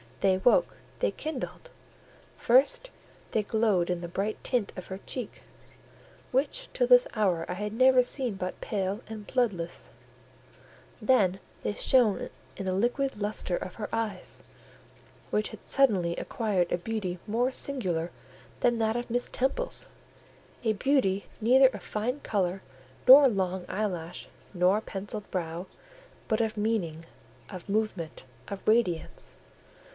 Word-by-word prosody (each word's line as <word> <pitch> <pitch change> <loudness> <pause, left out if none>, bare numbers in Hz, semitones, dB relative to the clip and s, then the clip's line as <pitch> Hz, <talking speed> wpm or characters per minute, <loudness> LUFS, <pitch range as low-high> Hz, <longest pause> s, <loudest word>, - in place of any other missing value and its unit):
They 190 -1 +4
woke, 245 - +3 0.2
they - - +2
kindled: 315 - -5 0.7
first, 285 - +3 0.4
they 220 - +2
glowed 205 -5 +2
in 180 -1 -1
the 170 - -4
bright 200 +5 -3
tint 240 -6 0
of 185 - -8
her 190 0 -6
cheek, 245 +1 -5 0.9
which 295 - 0
till - - +2
this - - +7
hour 185 -6 +1
I - - -3
had 210 +3 -4
never 255 +2 +6
seen 250 -3 -2
but 185 -1 -5
pale 200 +1 -2
and 215 -2 -7
bloodless; 195 -10 -1 1.1
then 205 -6 +3 0.2
they - - -1
shone 235 -3 +3 0.3
in 195 - -4
the 185 - 0
liquid 245 +6 0
lustre 205 -3 -1
of 185 - -6
her 210 - -5
eyes, 215 -5 -3 0.9
which 210 0 +1
had 220 - -11
suddenly 195 -11 +2
acquired 200 -7 -1
a 175 - +1
beauty 185 -3 -3
more 240 +5 +1
singular 185 -13 -1 0.5
than 240 -1 +3
that 220 0 +1
of 240 0 -3
Miss 245 +1 0
Temple's—a 265 - -4
beauty 200 -5 +1
neither 260 +4 +6
of - - -9
fine 240 +6 -2
colour 190 -2 -1 0.5
nor 275 +2 +11
long 190 -5 -1
eyelash, 180 -5 -3 0.2
nor 185 +3 +3
pencilled 205 0 -5
brow, 175 0 -3 0.6
but 220 +1 +1
of 220 -1 -1
meaning, 190 -7 -1 0.4
of 185 -1 -9
movement, 195 -9 -2 0.2
of 200 -1 -7
radiance. 215 -7 +1
210 Hz, 135 wpm, -28 LUFS, 185-245 Hz, 1.1 s, nor